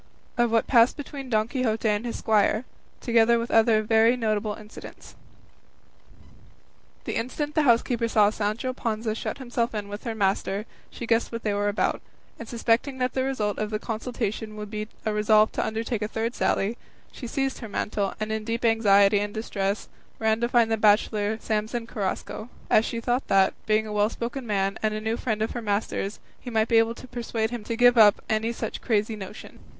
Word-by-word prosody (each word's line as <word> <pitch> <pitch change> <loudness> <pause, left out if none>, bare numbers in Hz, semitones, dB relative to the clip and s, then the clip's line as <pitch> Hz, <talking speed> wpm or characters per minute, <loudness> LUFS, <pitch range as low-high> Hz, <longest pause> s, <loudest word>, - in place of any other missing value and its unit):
OF 240 -1 +2
WHAT 225 0 +2
PASSED 235 +1 +4
BETWEEN 280 -2 -7
DON 215 -2 +2
QUIXOTE 235 -3 -1
AND 210 +1 +1
HIS 235 - -4
SQUIRE, 215 +2 +2 0.4
TOGETHER 235 0 +4
WITH 230 +1 -3
OTHER 220 -1 +4
VERY 225 +3 +4
NOTABLE 215 -2 -1
INCIDENTS 215 0 -12 1.9
The - - -4
instant 290 +6 -3
the 310 - +3
housekeeper 235 -3 +2
saw 210 -2 +4
Sancho 220 +4 -2
Panza 225 -2 -2
shut 220 - -4
himself 240 -3 -2
in 205 -1 -4
with 205 +1 -7
her 230 -2 -3
master, 200 0 0 0.2
she 235 - -7
guessed 230 0 +1
what 230 0 -5
they 210 - 0
were 205 0 0
about; 205 - 0 0.4
and 230 - -8
suspecting 240 +3 0
that 250 0 -1
the 260 - 0
result 220 -6 -1
of 215 0 -1
the 215 - -1
consultation 220 -1 -4
would 210 -1 -7
be 215 0 -4 0.2
a 215 - 0
resolve 215 0 +4
to - - -1
undertake 225 +1 -2
a 210 - -1
third 225 +2 -2
sally, 215 0 0 0.3
she 245 - -8
seized 270 +1 -2
her 225 - -7
mantle, 205 -1 -2
and 215 0 -3
in 220 0 -2
deep 230 +2 -2
anxiety 205 -3 +5
and 205 +1 -4
distress, 200 -2 -2 0.3
ran 220 0 +1
to 235 - +1
find 235 -2 +3
the 225 - +2
bachelor 210 0 +2
Samson 220 +2 -2
Carrasco, 215 +1 -4 0.2
as 220 - +5
she 230 - -3
thought 245 +3 -1
that, 195 -1 +4
being 215 0 +2
a 215 - -6
well 210 0 +2
spoken 240 +2 -5
man, 195 -1 0
and 215 -1 0
a - - -2
new 220 +1 -1
friend 220 -3 -1
of 220 - -2
her 240 - -4
master's, 205 -1 -2 0.2
he 245 - -8
might 220 -1 +1
be 230 - +6
able 225 +1 +1
to 255 - -11
persuade 230 -2 -3
him 240 -3 -5
to 230 - -2
give 245 0 +6
up 210 -2 +7
any 220 +1 +1
such 235 - -5
crazy 215 -1 0
notion. 205 +1 -10
220 Hz, 195 wpm, -25 LUFS, 210-235 Hz, 1.9 s, up